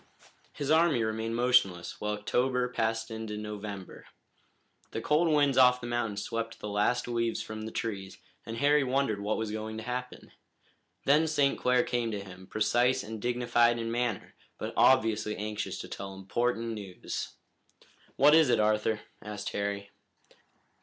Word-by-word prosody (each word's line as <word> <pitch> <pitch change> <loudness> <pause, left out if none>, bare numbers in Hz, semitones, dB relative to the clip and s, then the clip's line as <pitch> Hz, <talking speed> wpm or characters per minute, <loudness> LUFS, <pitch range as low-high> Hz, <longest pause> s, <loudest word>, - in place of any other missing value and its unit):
His 145 0 -3
army 160 -7 +4
remained 110 +1 -2
motionless 120 -8 +2
while 105 0 -1
October 125 +4 0
passed 115 -2 -1
into 110 -1 -5
November. 105 -2 -7 0.8
The - - -4
cold 150 +8 +2
winds 145 -4 +3
off 125 -1 +6
the 120 - -7
mountains 115 -4 -2
swept 115 +1 -4
the 105 - -5
last 105 +5 +1
leaves 115 -1 -1
from 110 0 -7
the - - -6
trees, 100 -4 -4 0.3
and 115 0 -6
Harry 145 +2 +4
wondered 130 -5 0
what 105 +1 -1
was 110 -1 -3
going 110 0 -4
to 110 - -6
happen. 125 +1 -5 0.7
Then 150 +3 +4
St. 145 -3 +2
Clair 125 -1 +2
came 120 -2 -1
to 105 -2 -3
him, 95 -1 -12
precise 120 +5 +2
and 110 0 -7
dignified 120 0 +2
in 115 0 -3
manner, 120 -3 -2 0.2
but - - -5
obviously 110 -4 +3
anxious 105 0 -4
to - - -8
tell 95 0 -7
important 115 +4 -1
news. 100 -5 -5 0.8
"What 145 +3 +6
is 160 -4 +6
it, 120 -2 +3
Arthur?" 105 0 +1 0.2
asked 105 -1 -5
Harry. 100 0 -3
115 Hz, 155 wpm, -29 LUFS, 105-125 Hz, 0.8 s, off